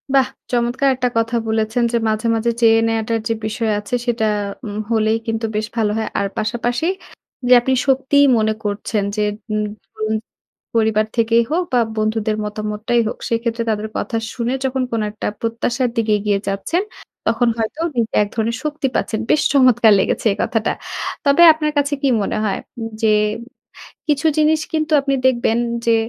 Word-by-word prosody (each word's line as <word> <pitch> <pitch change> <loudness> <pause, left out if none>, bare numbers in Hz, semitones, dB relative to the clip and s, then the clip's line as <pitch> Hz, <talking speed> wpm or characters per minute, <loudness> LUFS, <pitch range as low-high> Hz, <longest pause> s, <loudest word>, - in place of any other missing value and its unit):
বাহ! 265 -1 +5 0.2
চমৎকার 245 +3 +1
একটা 250 -1 0
কথা 230 +1 0
বলেছেন 220 +2 0
যে, 235 - +2
মাঝে, 215 +1 -1
মাঝে 230 +1 +1
চেয়ে 225 -1 +6
নেয়াটার 225 0 0
যে 225 - +1
বিষয় 220 0 -1
আছে, 210 +4 -3
সেটা 235 -2 0 0.4
উম 205 -1 -5
হলেই 220 -1 +2
কিন্তু 225 0 -1
বেশ 215 0 -1
ভালো 215 -2 +2
হয় 220 - -2
আর 200 - 0
পাশাপাশি 240 +7 -1 0.6
যে 250 - +7
আপনি 260 +2 0
সত্যিই 275 +2 +4
মনে 220 0 +2
করছেন 205 0 -2
যে, 210 - 0 0.3
উম 215 0 0 0.2
ধরুন 215 0 -4 0.6
পরিবার 220 -1 +2
থেকেই 230 0 +3
হোক 350 +3 +1
বা 245 - +4 0.2
বন্ধুদের 215 0 0
মতামতটাই 215 +3 -1
হোক, - - -4
সেক্ষেত্রে 230 0 -1
তাদের 215 0 -1
কথা 230 - -3 0.2
শুনে 240 0 -2
যখন 265 0 0
কোন 230 -1 0
একটা 215 - -5
প্রত্যাশার 240 +2 -1
দিকে 225 -2 0
এগিয়ে 205 -1 0
যাচ্ছেন, 200 - -1 0.5
তখন 230 +2 +2
হয়তো 230 +8 -3
নিজে 230 -2 -1
এক - - -4
ধরনের 230 +1 -1
শক্তি 300 -2 -1
পাচ্ছেন। 220 - -1
বেশ 305 - +4
চমৎকার 250 -5 +5
লেগেছে - - -1
এই - - -9
কথাটা! 225 -1 0 0.5
তবে 280 +4 +4
আপনার 305 -1 -1
কাছে 285 0 +1
কী 275 - +2
মনে 200 - -2
হয়? 195 -2 -1 0.2
উম 225 0 -4
যে 220 -1 +4 1.0
কিছু 300 +1 +2
জিনিস 310 +1 +3
কিন্তু 315 0 -1
আপনি 275 0 -1
দেখবেন 235 -3 +2 0.3
যে, 230 - +5
230 Hz, 170 wpm, -19 LUFS, 215-255 Hz, 1.0 s, যে